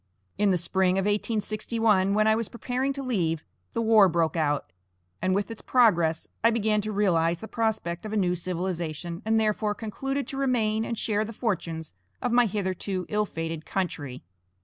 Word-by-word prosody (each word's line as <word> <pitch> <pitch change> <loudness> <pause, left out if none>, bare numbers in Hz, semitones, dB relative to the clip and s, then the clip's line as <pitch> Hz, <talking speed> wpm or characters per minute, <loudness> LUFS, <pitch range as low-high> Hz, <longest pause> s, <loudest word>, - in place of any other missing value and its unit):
In 205 -1 +2
the 185 - +3
spring 185 +2 +2
of 195 - +1
1861, 210 -1 +1
when 215 0 +3
I 220 - +5
was 225 -1 -2
preparing 255 +3 -2
to 275 0 -5
leave, 170 - 0 0.3
the 230 - 0
war 220 -3 +6
broke 165 -1 +1
out, 145 - 0 0.5
and 185 +1 +2
with 205 +2 -1
its 225 - -8
progress 170 -10 +3 0.2
I 230 - +7
began 215 -2 +1
to 215 +1 -4
realize 175 -5 +2
the 220 - -7
prospect 215 -7 -1
of 215 - -6
a 215 - 0
new 180 -3 +2
civilization, 175 -2 -3
and, 220 0 +3
therefore, 210 -1 +1
concluded 270 +6 -3
to 270 - -5
remain 225 -5 +1
and 230 - -3
share 210 -1 0
the 225 +1 -6
fortunes 165 - -3 0.3
of 245 - -1
my 240 0 +5
hitherto 190 -2 -2
ill 210 0 +1
fated 165 -2 -4
country. 145 -10 -3
205 Hz, 180 wpm, -27 LUFS, 175-225 Hz, 0.5 s, I